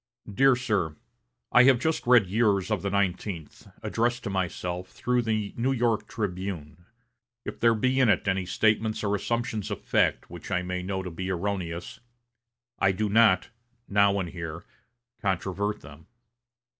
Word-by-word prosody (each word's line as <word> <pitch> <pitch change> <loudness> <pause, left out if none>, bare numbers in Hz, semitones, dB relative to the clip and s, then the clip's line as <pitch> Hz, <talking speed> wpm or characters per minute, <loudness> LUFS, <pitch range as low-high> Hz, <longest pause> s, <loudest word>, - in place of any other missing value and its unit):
"DEAR 130 +5 +4
SIR: 105 -11 -1 0.6
I 125 +1 +7
have 135 -2 +6
just 160 -2 -1
read 120 -4 +6
yours 100 0 +1
of 105 -5 0
the 100 - -2
nineteenth, 95 -3 -2 0.2
addressed 120 +1 0
to 100 - -3
myself 90 -1 -3
through 125 0 0
the 110 -3 -2
New 125 +3 0
York 120 -4 0
'Tribune.' 90 -5 -5 0.6
If - - -6
there 115 -1 +4
be 130 +4 +1
in 130 -3 +4
it - - +2
any 95 -1 0
statements 110 +2 +1
or 100 -1 0
assumptions 110 0 -2
of - - -5
fact - - +1
which - - -10
I 90 - 0
may 90 0 -3
know 95 +1 -3
to 90 - -6
be 95 +3 -5
erroneous, 90 -2 -3 0.8
I 95 - +4
do 105 +2 -1
not, 110 -3 +4 0.4
now 100 0 +3
and 90 -3 -3
here, 85 -1 -7 0.6
controvert 100 +1 -1
them. 70 +2 -14
100 Hz, 155 wpm, -27 LUFS, 90-115 Hz, 0.8 s, I